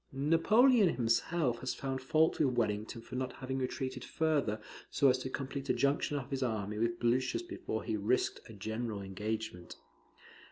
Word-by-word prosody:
Napoleon 195 - +5
himself 120 +2 +1
has 130 - -3
found 135 -1 -3
fault 155 +5 +2
with 130 -5 +2
Wellington 110 +1 -1
for - - -13
not 130 0 -2
having 130 0 -4
retreated 130 0 -3
further, 145 -9 0 0.3
so 140 - +4
as 130 0 +3
to 130 - -4
complete 135 +1 -5
a - - +4
junction 145 +1 +1
of 135 -1 -6
his 135 -1 -2
army 105 -4 -2
with 115 +1 0
Blucher's 130 - +1
before 345 - -4
he 110 - -1
risked 105 +5 0
a - - -9
general 110 0 -4
engagement. 105 -1 -4
130 Hz, 165 wpm, -33 LUFS, 110-140 Hz, 0.3 s, Napoleon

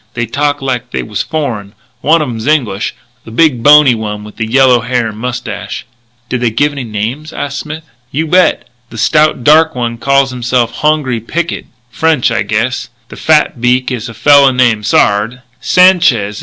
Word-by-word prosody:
They 120 0 -1
talk 145 +4 -2
like 125 -2 -3
they - - -3
was 105 -2 -4
foreign. 115 -10 -4 0.3
One 160 +1 +3
of - - -4
'em's 115 -1 -5
English 120 -10 0 0.3
the - - -12
big, 125 +1 +1
bony 145 -1 +6
one 105 -2 -5
with 105 +2 -12
yellow 125 +2 +3
hair 120 -1 -1
and 105 - -10
mustache." 120 -3 -5 0.4
"Did 125 -1 -3
they 120 - +2
give 145 +7 0
any 140 -2 -6
names?" 115 +8 -5
asked 140 0 -5
Smith. 155 +1 -7 0.3
"You 155 +4 -1
bet. 180 +3 +2 0.2
The 115 - -11
stout, 150 +3 +2
dark 155 +2 +4
man 120 -1 -3
calls 140 0 +2
himself 120 -1 -1
Hongri 150 -6 0
Picket. 170 +9 -4 0.2
French, 160 -6 +1
I 115 - 0
guess. 115 +3 -2 0.2
The - - -10
fat 150 -6 +1
beak 125 +1 +1
is 120 -2 -4
a 115 - -11
fella 140 +3 +5
named 120 -4 +1
Sard. 110 +5 +1
125 Hz, 170 wpm, -12 LUFS, 115-145 Hz, 0.4 s, bony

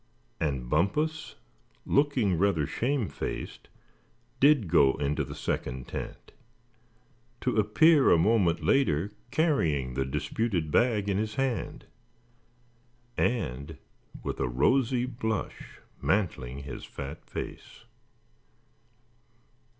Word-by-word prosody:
And 70 -6 -2
Bumpus, 150 - 0 0.5
looking 135 -9 +2
rather 85 -4 +2
shame 125 - -1
faced, - - -6 0.7
did 140 -7 +5
go 70 -4 +5
into 75 0 -1
the - - -8
second 65 0 -3
tent; - - -7 1.1
to 125 - 0
appear 135 +8 +5
a - - +6
moment 90 -1 +2
later 105 - +2 0.2
carrying 85 - +1
the 65 +1 0
disputed 85 - -2
bag 110 -2 +2
in 100 -1 +1
his 110 0 -3
hand, 135 -3 -2 1.3
and 75 - -1 0.5
with - - -4
a 65 - 0
rosy 120 - +2
blush 110 -4 -4 0.2
mantling 70 -10 -1
his 70 -2 -7
fat 70 +3 -8
face. - - -8
100 Hz, 100 wpm, -28 LUFS, -, 1.3 s, a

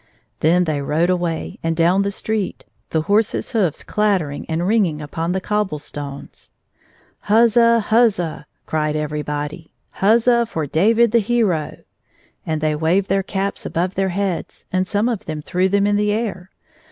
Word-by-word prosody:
Then 175 +3 +3
they 155 -4 -1
rode 160 +5 +1
away 175 -3 -2
and 165 0 -1
down 175 +4 +3
the 200 - 0
street, 210 0 -3 0.2
the 160 -1 0
horses' 205 +4 +1
hoofs 200 - 0
clattering 190 -9 -1
and 165 +2 -1
ringing 195 -8 +2
upon 160 +3 -3
the 190 - 0
cob 210 +1 -1
ble 150 - -4
stones. 145 -1 -8 0.4
" - - -35
Huzza! 230 +1 +5
huzza! 210 -10 +2
" - - -48
cried 155 -1 -1
everybody; 150 +1 -4
" - - -48
Huzza 235 +3 +4
for 160 -8 -3
David 220 - +3
the 235 - +4
hero! 210 -8 0 0.3
" - - -37
and 155 -1 -1
they 155 -1 +1
waved 170 +6 +1
their 195 +1 +2
caps 195 +1 -3
above 180 +3 -2
their 190 0 0
heads, 190 -1 -3
and 185 0 0
some 205 +4 0
of 235 -5 -2
them 155 -2 -5
threw 185 +4 0
them 200 +1 +2
in 205 0 +2
the 210 0 +1
air. 205 -4 -3
185 Hz, 175 wpm, -20 LUFS, 160-210 Hz, 0.4 s, Huzza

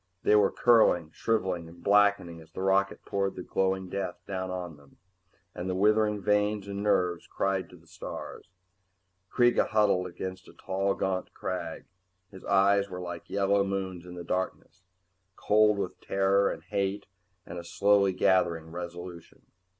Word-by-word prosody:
They 105 - +4
were 105 -2 +5
curling, 100 -9 +4
shriveling 95 -7 -1
and 85 +1 -16
blackening 100 -5 +3
as 80 0 -17
the 95 - -5
rocket 95 +1 +1
poured 100 -1 -1
the 90 - -6
glowing 95 0 -1
death 95 -1 -4
down 95 -1 -4
on 90 -3 -5
them, 70 -1 -21 0.6
and 90 +2 -5
the 90 - -1
withering 105 +1 +3
veins 105 0 +1
and 100 0 -4
nerves 90 -4 +1
cried 95 -2 -1
to - - -14
the 85 - -22
stars. 80 - -8 0.8
Kreega 120 -1 +3
huddled 105 -5 +2
against 95 +1 -7
a - - -14
tall 95 +1 -1
gaunt 95 -1 -3
crag. 85 -3 -5 0.5
His 95 -2 -12
eyes 100 0 +3
were 90 -1 -6
like 85 -1 -7
yellow 100 0 +2
moons 95 -2 -4
in 90 - -9
the 90 - -7
darkness, 90 0 -4 0.5
cold 105 0 +3
with 95 -3 -4
terror 100 0 +2
and - - -6
hate 100 0 -2 0.4
and 85 - -7
a - - -8
slowly 100 +3 +3
gathering 85 -3 +1
resolution. 85 0 -8
95 Hz, 160 wpm, -28 LUFS, 90-100 Hz, 0.8 s, were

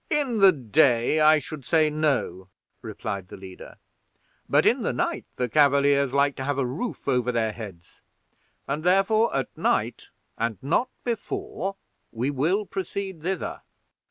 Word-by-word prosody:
"In 265 -7 0
the 195 -1 +8
day 130 - +2
I 155 0 +6
should 150 0 -7
say 155 +2 +2
no," 135 - -1 0.3
replied 105 -4 -5
the - - -10
leader; 95 -1 -11 0.7
"but - - +3
in - - +3
the - - 0
night - - -2
the 125 - -1
Cavaliers 140 0 +3
like 140 0 +2
to 135 - -4
have 140 +1 -1
a 135 - +1
roof 155 - -5
over 125 -2 +1
their 115 -2 0
heads; 100 -7 -11 0.7
and, 145 +3 -3
therefore, 195 +5 +3
at 135 -1 -2
night, - - -1 0.3
and 115 -2 -1
not 175 - +1
before, 380 - -4 0.4
will 140 - 0
we - - -17
proceed 190 -2 -5
thither." 185 +2 -3
145 Hz, 150 wpm, -25 LUFS, 125-185 Hz, 0.7 s, the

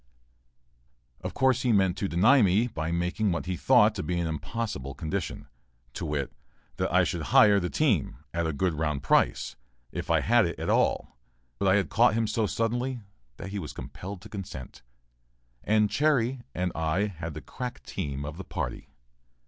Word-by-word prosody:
Of - - -5
course, 130 -1 +3
he 125 - +2
meant 95 -4 +3
to 100 - 0
deny 110 +11 +5
me 100 +3 +4
by 80 -8 -3
making 90 +4 0
what 85 - -2
he 90 0 -2
thought - - +5
to - - -4
be 85 +4 -2
an 85 - 0
impossible 80 - -4
condition, 85 +1 -4 0.5
to - - -4
wit: 75 -2 -2 0.4
that - - -1
I - - +5
should - - -2
hire 105 -2 +6
the 90 -2 -2
team, 120 - +1 0.2
at 85 -1 0
a - - 0
good 85 +4 0
round 75 -3 -2
price, - - +2 0.3
if - - -5
I - - +3
had - - +4
it - - -5
at - - -1
all, - - +1 0.4
but 100 - +1
I 95 - +5
had 100 -4 +1
caught 115 0 +4
him 115 0 +1
so 110 0 0
suddenly 120 +4 -1 0.4
that 100 - -7
he 100 +1 -4
was 75 -7 -6
compelled 95 0 -8
to 110 - -12
consent, 95 -10 -8 0.8
and 105 0 +3
"Chairy" 130 -1 +1
and 90 0 -1
I 80 +6 0
had 80 -6 -6
the 75 - -6
crack 125 - -6
team 70 0 -4
of 75 +2 -6
the 95 - -6
party. 80 -8 -5
95 Hz, 185 wpm, -28 LUFS, 80-110 Hz, 0.8 s, hire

